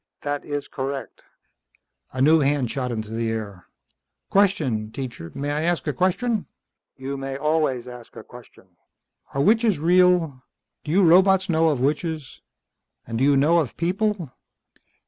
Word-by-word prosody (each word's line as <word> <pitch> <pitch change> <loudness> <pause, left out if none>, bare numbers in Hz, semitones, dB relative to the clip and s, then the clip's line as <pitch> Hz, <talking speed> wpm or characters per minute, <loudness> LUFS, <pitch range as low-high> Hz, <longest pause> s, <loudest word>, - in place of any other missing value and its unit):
"That 145 0 -3
is 145 -1 -4
correct." 135 -1 -5 0.9
A 130 +1 -1
new 160 +3 +5
hand 140 -4 +1
shot 125 -3 -3
into 110 -2 -5
the 115 0 -2
air. 105 -5 -6 0.6
"Question, 145 - +1
teacher. 120 -11 -7
May 145 +1 -3
I 150 +1 -1
ask 170 +1 0
a 150 - -1
question?" 205 - 0 0.5
"You 135 +1 -5
may 135 0 -5
always 150 -5 0
ask 125 -2 -11
a - - -9
question." 120 -5 -15 0.7
"Are 140 - +1
witches 225 +1 +3
real? 175 -3 +3 0.4
Do 150 - -5
you 185 +1 +4
robots 190 +2 +5
know 160 -1 +3
of 140 -5 -1
witches? 155 +1 -2 0.6
And 115 0 -4
do - - +1
you 140 0 +4
know 160 +5 +4
of 145 -8 -3
people? 185 -2 -1
145 Hz, 150 wpm, -23 LUFS, 130-170 Hz, 0.9 s, new